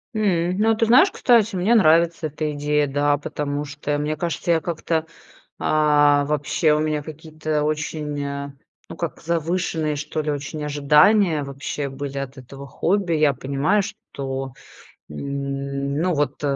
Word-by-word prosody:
М, 180 Hz, -4 st, +1 dB
ну, 220 Hz, +2 st, +3 dB
ты 225 Hz, -, +2 dB
знаешь, 255 Hz, -, +6 dB
кстати, 235 Hz, -, +3 dB
мне 190 Hz, +6 st, +2 dB
нравится 165 Hz, -4 st, +4 dB
эта 150 Hz, 0 st, -3 dB
идея, 145 Hz, 0 st, +1 dB
да, 145 Hz, +1 st, +1 dB
потому 145 Hz, 0 st, -4 dB
что, 145 Hz, +1 st, -3 dB
мне 150 Hz, +1 st, -2 dB
кажется, 170 Hz, +2 st, -2 dB
я 165 Hz, -1 st, +3 dB
как-то, 165 Hz, -1 st, -2 dB, 0.5 s
а, 145 Hz, -1 st, +3 dB
вообще, 150 Hz, +2 st, +1 dB
у 150 Hz, -, +1 dB
меня 155 Hz, -1 st, -1 dB
какие-то 155 Hz, 0 st, -4 dB
очень, 150 Hz, -1 st, -2 dB
а, 140 Hz, 0 st, -5 dB, 0.4 s
ну -, -, -7 dB
как, -, -, -4 dB
завышенные, 165 Hz, -2 st, -1 dB
что 150 Hz, +2 st, -4 dB
ли, 150 Hz, -, -2 dB
очень 145 Hz, +1 st, -4 dB
ожидания 150 Hz, +4 st, +4 dB
вообще 140 Hz, +1 st, -4 dB
были 140 Hz, +1 st, -6 dB
от 135 Hz, 0 st, -6 dB
этого 135 Hz, +2 st, -10 dB
хобби. 180 Hz, +6 st, 0 dB
Я 150 Hz, -2 st, +3 dB
понимаю, 140 Hz, +11 st, 0 dB
что, 135 Hz, -, -6 dB, 0.6 s
н 140 Hz, -, -3 dB
ну, 180 Hz, +1 st, +1 dB
вот, 145 Hz, -1 st, -1 dB
150 Hz, 150 wpm, -22 LUFS, 145-170 Hz, 0.6 s, знаешь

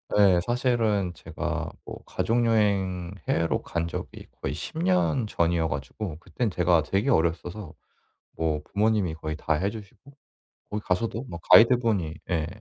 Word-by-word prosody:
예. 100 Hz, -4 st, +6 dB
사실은 115 Hz, -6 st, +1 dB
제가 -, -, -4 dB
뭐 -, -, -8 dB
가족여행 100 Hz, -6 st, +1 dB, 0.2 s
해외로 85 Hz, 0 st, +1 dB
간 85 Hz, 0 st, -2 dB
적이 -, -, -7 dB, 0.2 s
거의 -, -, -2 dB
10 -, -, -7 dB
년 90 Hz, +5 st, +2 dB
전이어 85 Hz, -3 st, +1 dB
가지고 75 Hz, +5 st, -5 dB
그때는 115 Hz, +6 st, -2 dB
제가 90 Hz, -3 st, +3 dB
되게 100 Hz, -, 0 dB
어렸어서 85 Hz, -, 0 dB, 0.6 s
뭐 80 Hz, -2 st, -1 dB
부모님이 105 Hz, -4 st, +1 dB
거의 80 Hz, 0 st, -5 dB
다 80 Hz, +1 st, -1 dB
해 90 Hz, +6 st, 0 dB
주시고 110 Hz, +5 st, -12 dB, 0.6 s
거기 105 Hz, 0 st, -3 dB
가서도 115 Hz, +6 st, -1 dB
뭐 85 Hz, -, -6 dB
가이드분이 115 Hz, -9 st, +5 dB, 0.2 s
예 80 Hz, -3 st, 0 dB
95 Hz, 290 characters per minute, -26 LUFS, 85-110 Hz, 0.6 s, 예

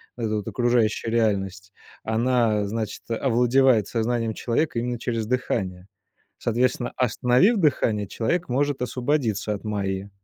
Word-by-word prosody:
вот 120 Hz, -, -3 dB
эта 110 Hz, -, -1 dB
вот 105 Hz, -, -5 dB
окружающая 120 Hz, -2 st, +1 dB
реальность, 100 Hz, -3 st, -1 dB, 0.3 s
она, 115 Hz, -2 st, +1 dB
значит, 110 Hz, +1 st, -4 dB
овладевает 120 Hz, -1 st, +3 dB
сознанием 115 Hz, -1 st, -1 dB
человека 120 Hz, +3 st, -1 dB
именно 120 Hz, +1 st, -2 dB
через 115 Hz, -1 st, -2 dB
дыхание. 100 Hz, -7 st, -2 dB, 0.5 s
Соответственно, 120 Hz, +1 st, 0 dB
остановив 125 Hz, -, +3 dB
дыхание, 115 Hz, -, +1 dB
человек 165 Hz, -, -1 dB
может 140 Hz, +1 st, 0 dB
освободиться 120 Hz, -5 st, -1 dB
от 100 Hz, -, -7 dB
Майи. 100 Hz, -1 st, -2 dB
115 Hz, 125 wpm, -24 LUFS, 105-125 Hz, 0.5 s, овладевает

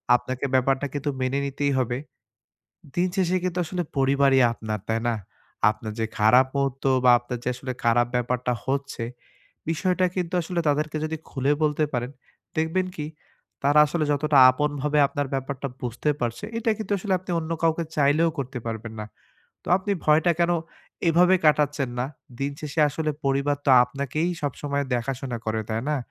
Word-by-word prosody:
আপনাকে 130 Hz, +2 st, -2 dB
ব্যাপারটা 135 Hz, +2 st, +2 dB
কিন্তু 145 Hz, 0 st, -2 dB
মেনে 130 Hz, +2 st, 0 dB
নিতেই 140 Hz, +1 st, -1 dB
হবে। 125 Hz, -1 st, -1 dB, 1.0 s
দিন 180 Hz, +1 st, +2 dB
শেষে 185 Hz, -1 st, +2 dB
কিন্তু 180 Hz, 0 st, -1 dB
আসলে 175 Hz, +2 st, -3 dB, 0.2 s
পরিবারই 135 Hz, 0 st, +4 dB
আপনার 110 Hz, -2 st, -4 dB
তাই 110 Hz, 0 st, 0 dB
না? 115 Hz, -, +1 dB, 0.6 s
আপনার 110 Hz, 0 st, -6 dB
যে 110 Hz, -, +1 dB
খারাপ 125 Hz, +5 st, +6 dB
মুহূর্ত 135 Hz, -1 st, -1 dB, 0.2 s
বা 125 Hz, -, +7 dB
আপনার 120 Hz, 0 st, -6 dB
যে -, -, 0 dB
আসলে 130 Hz, +1 st, -5 dB
খারাপ 120 Hz, +1 st, +4 dB
ব্যাপারটা 125 Hz, 0 st, 0 dB
হচ্ছে, 140 Hz, -3 st, -2 dB, 0.7 s
বিষয়টা 185 Hz, +2 st, +1 dB
কিন্তু 180 Hz, 0 st, -2 dB
আসলে 170 Hz, +1 st, -2 dB
তাদেরকে 150 Hz, +2 st, 0 dB
যদি 160 Hz, +1 st, -2 dB
খুলে 135 Hz, +1 st, +1 dB
বলতে 150 Hz, 0 st, +2 dB
পারেন, 125 Hz, 0 st, -2 dB, 0.5 s
দেখবেন 165 Hz, +4 st, +1 dB
কি 150 Hz, -, -4 dB, 0.6 s
তারা 145 Hz, +2 st, +4 dB
আসলে 155 Hz, +1 st, -1 dB
যতটা 145 Hz, 0 st, +1 dB
আপন 150 Hz, +3 st, 0 dB
ভাবে 150 Hz, 0 st, +1 dB
আপনার 145 Hz, 0 st, -2 dB
ব্যাপারটা 135 Hz, +1 st, -3 dB
বুঝতে 125 Hz, +5 st, -1 dB
পারছে, 120 Hz, -, -3 dB
এটা 230 Hz, 0 st, +1 dB
কিন্তু 215 Hz, -2 st, -4 dB
আসলে 190 Hz, +1 st, -2 dB
আপনি 185 Hz, 0 st, -9 dB
অন্য 160 Hz, 0 st, -4 dB
কাউকে 165 Hz, 0 st, +2 dB
চাইলেও 150 Hz, +3 st, +3 dB
করতে 130 Hz, -1 st, -4 dB
পারবেন 110 Hz, 0 st, -5 dB
না। 105 Hz, -, -5 dB, 0.6 s
তো -, -, -9 dB
আপনি 200 Hz, +2 st, -2 dB
ভয়টা 160 Hz, +3 st, +4 dB
কেন, 170 Hz, 0 st, +3 dB, 0.6 s
এভাবে 180 Hz, +3 st, +5 dB
কাটাচ্ছেন 145 Hz, -3 st, +2 dB
না। 125 Hz, -, 0 dB, 0.3 s
দিন 140 Hz, +1 st, -1 dB
শেষে 150 Hz, +1 st, -2 dB
আসলে 155 Hz, +2 st, -2 dB
পরিবার 140 Hz, +1 st, +1 dB
তো 140 Hz, -, +5 dB
আপনাকেই 140 Hz, +6 st, -2 dB
সবসময় 140 Hz, 0 st, -2 dB
দেখাশোনা 125 Hz, 0 st, -3 dB
করে 110 Hz, 0 st, 0 dB
তাই 110 Hz, +2 st, -1 dB
না? 150 Hz, -, +1 dB
140 Hz, 165 wpm, -25 LUFS, 125-160 Hz, 1.0 s, বা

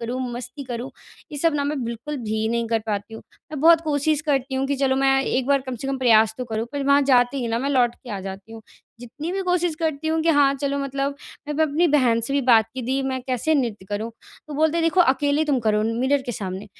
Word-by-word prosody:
करूँ 245 Hz, +2 st, -3 dB
मस्ती 255 Hz, +4 st, -7 dB
करूँ 245 Hz, +1 st, -5 dB, 0.4 s
ये 290 Hz, -, -5 dB
सब 330 Hz, +1 st, +2 dB
ना 285 Hz, -1 st, 0 dB
मैं 285 Hz, -2 st, -2 dB
बिल्कुल 235 Hz, +6 st, -5 dB
भी 220 Hz, 0 st, -1 dB
नहीं 235 Hz, 0 st, -1 dB
कर 225 Hz, -1 st, +1 dB
पाती 205 Hz, +1 st, -3 dB
हूँ। -, -, -9 dB, 0.3 s
मैं 300 Hz, -, -4 dB
बहुत 330 Hz, +1 st, +6 dB
कोशिश 300 Hz, -1 st, 0 dB
करती 275 Hz, -3 st, -1 dB
हूँ 265 Hz, +1 st, 0 dB
कि 280 Hz, 0 st, -1 dB
चलो 265 Hz, -1 st, +1 dB
मैं 270 Hz, 0 st, +3 dB
एक 260 Hz, -1 st, -1 dB
बार 280 Hz, -1 st, +3 dB
कम 260 Hz, -, -4 dB
से 270 Hz, -, -6 dB
कम 270 Hz, -1 st, -2 dB
प्रयास 220 Hz, -3 st, +4 dB
तो 250 Hz, -, -3 dB
करूँ 225 Hz, -1 st, -3 dB
पर 285 Hz, -1 st, -2 dB
वहाँ 280 Hz, +1 st, +4 dB
जाते 250 Hz, -1 st, +3 dB
ही 240 Hz, -3 st, -2 dB
ना 230 Hz, +1 st, 0 dB
मैं 275 Hz, +3 st, -1 dB
लौट 245 Hz, -3 st, +2 dB
के 245 Hz, -, -13 dB
आ 200 Hz, -2 st, -4 dB
जाती 195 Hz, +3 st, -8 dB
हूँ। 225 Hz, -1 st, -10 dB, 0.4 s
जितनी 275 Hz, +8 st, -6 dB
भी 385 Hz, 0 st, -2 dB
कोशिश 355 Hz, -2 st, 0 dB
करती 315 Hz, -1 st, -1 dB
हूँ 320 Hz, 0 st, +1 dB
कि 330 Hz, -, 0 dB
हाँ 285 Hz, -2 st, +4 dB
चलो 280 Hz, 0 st, -2 dB
मतलब 275 Hz, 0 st, -2 dB, 0.3 s
मैं 295 Hz, -, -3 dB
अपनी 310 Hz, +4 st, +2 dB
बहन 250 Hz, -6 st, +3 dB
से 230 Hz, -, -3 dB
भी 280 Hz, -, +2 dB
बात 230 Hz, -3 st, +5 dB
की 260 Hz, -, -4 dB
दी 260 Hz, +3 st, -1 dB
मैं 260 Hz, -1 st, -2 dB
कैसे 255 Hz, +5 st, 0 dB
नृत्य 230 Hz, -9 st, -1 dB
करूँ 210 Hz, +3 st, -3 dB, 0.4 s
तो 295 Hz, -, -6 dB
बोलते 315 Hz, +2 st, +2 dB
हैं, 335 Hz, -, +1 dB
"देखो 345 Hz, +3 st, +3 dB
अकेले 290 Hz, 0 st, +2 dB
तुम 285 Hz, -4 st, +1 dB
करो 215 Hz, -1 st, +1 dB
मिरर 255 Hz, +5 st, 0 dB
के 245 Hz, -, -2 dB
सामने", 190 Hz, -1 st, -5 dB
270 Hz, 255 wpm, -23 LUFS, 230-290 Hz, 0.4 s, बहुत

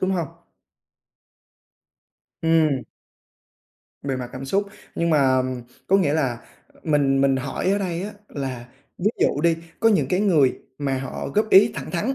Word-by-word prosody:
đúng 185 Hz, -, +1 dB
hông? 170 Hz, -5 st, -1 dB, 2.1 s
Ừm. 160 Hz, -5 st, +3 dB, 1.2 s
Về 135 Hz, -2 st, -2 dB
mặt 125 Hz, -1 st, -5 dB
cảm 130 Hz, +1 st, -6 dB
xúc 195 Hz, +9 st, 0 dB, 0.3 s
nhưng 170 Hz, 0 st, 0 dB
mà, 155 Hz, -, +4 dB, 0.2 s
ờm, 130 Hz, -1 st, -1 dB, 0.2 s
có 195 Hz, -, +4 dB
nghĩa 150 Hz, -7 st, +2 dB
là 130 Hz, -7 st, 0 dB, 0.5 s
mình 140 Hz, -3 st, +2 dB
mình 135 Hz, -1 st, +3 dB
hỏi 140 Hz, +7 st, -2 dB
ở 200 Hz, -, +2 dB
đây 180 Hz, -3 st, -3 dB
á 205 Hz, -, -4 dB, 0.2 s
là 130 Hz, -4 st, -5 dB, 0.3 s
ví 205 Hz, +5 st, +2 dB
dụ 145 Hz, -, +2 dB
đi, 165 Hz, 0 st, +3 dB, 0.2 s
có 225 Hz, -, +5 dB
những 160 Hz, -12 st, +2 dB
cái 185 Hz, +2 st, +1 dB
người 160 Hz, -10 st, +4 dB, 0.3 s
mà 135 Hz, -2 st, -1 dB
họ 135 Hz, -1 st, -5 dB
góp 215 Hz, +1 st, +2 dB
ý 210 Hz, +4 st, +7 dB
thẳng -, -, -6 dB
thắn, 210 Hz, +10 st, -1 dB
155 Hz, 165 wpm, -23 LUFS, 135-185 Hz, 2.1 s, ý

